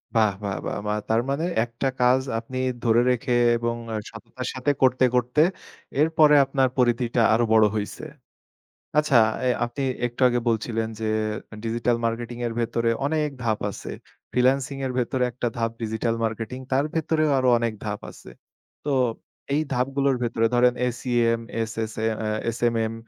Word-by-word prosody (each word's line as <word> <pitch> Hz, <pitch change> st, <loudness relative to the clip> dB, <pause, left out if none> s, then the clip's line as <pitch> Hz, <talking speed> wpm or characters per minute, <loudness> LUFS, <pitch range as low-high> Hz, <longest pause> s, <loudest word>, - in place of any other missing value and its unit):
বাহ! 110 Hz, -3 st, +4 dB
বাহ! 100 Hz, -1 st, -2 dB
বাহ! -, -, -3 dB
বা 105 Hz, -, +1 dB, 0.2 s
তার 115 Hz, +1 st, +3 dB
মানে 150 Hz, +5 st, 0 dB, 0.2 s
একটা 120 Hz, +3 st, -3 dB
কাজ 125 Hz, +2 st, +4 dB, 0.2 s
আপনি 130 Hz, +3 st, -8 dB, 0.3 s
ধরে 115 Hz, 0 st, +4 dB
রেখে 125 Hz, 0 st, 0 dB, 0.2 s
এবং 115 Hz, 0 st, -1 dB, 0.3 s
সততার 115 Hz, +3 st, -8 dB
সাথে 130 Hz, +2 st, 0 dB
করতে, 130 Hz, 0 st, +4 dB
করতে 125 Hz, +4 st, +2 dB, 0.6 s
এরপরে 155 Hz, -2 st, +5 dB
আপনার 135 Hz, -1 st, +1 dB
পরিধিটা 120 Hz, -1 st, +2 dB
আরো 115 Hz, +1 st, +3 dB
বড় 110 Hz, -1 st, +6 dB
হইছে। 105 Hz, +7 st, -4 dB, 0.9 s
আচ্ছা 150 Hz, -5 st, +4 dB, 0.3 s
এ -, -, +3 dB, 0.2 s
আপনি 120 Hz, +4 st, -4 dB, 0.2 s
একটু 120 Hz, +2 st, -9 dB
আগে 120 Hz, 0 st, 0 dB
বলছিলেন 115 Hz, 0 st, -1 dB
যে 110 Hz, -, -1 dB, 0.6 s
ডিজিটাল 115 Hz, +1 st, 0 dB
মার্কেটিং 120 Hz, +1 st, -3 dB
এর 115 Hz, -, -2 dB
ভেতরে 115 Hz, 0 st, 0 dB, 0.2 s
অনেক 150 Hz, 0 st, 0 dB
ধাপ 110 Hz, -2 st, +1 dB
আছে। -, -, -8 dB, 0.4 s
ফ্রিল্যান্সিং 130 Hz, +2 st, +2 dB
এর 130 Hz, -, -2 dB
ভেতরে 125 Hz, +1 st, 0 dB
একটা 120 Hz, 0 st, -2 dB
ধাপ 115 Hz, -1 st, 0 dB
ডিজিটাল 110 Hz, +1 st, -1 dB
মার্কেটিং, 115 Hz, +2 st, -3 dB
তার 135 Hz, +2 st, +3 dB
ভেতরেও 155 Hz, -1 st, +1 dB
আরো 130 Hz, -1 st, +2 dB
অনেক 115 Hz, -1 st, -1 dB
ধাপ 105 Hz, -1 st, -3 dB
আছে। -, -, -14 dB, 0.6 s
তো 145 Hz, -, +1 dB, 0.6 s
এই 155 Hz, -, +2 dB
ধাপগুলোর 135 Hz, +2 st, +1 dB
ভেতরে 115 Hz, -1 st, +1 dB
ধরেন 125 Hz, 0 st, +4 dB
এসইএম, 120 Hz, -2 st, 0 dB, 0.2 s
এসএসএ, 110 Hz, 0 st, -4 dB, 0.2 s
এ্যা 110 Hz, 0 st, -1 dB
এসএমএম, 115 Hz, -1 st, 0 dB
120 Hz, 150 wpm, -24 LUFS, 115-130 Hz, 0.9 s, বড়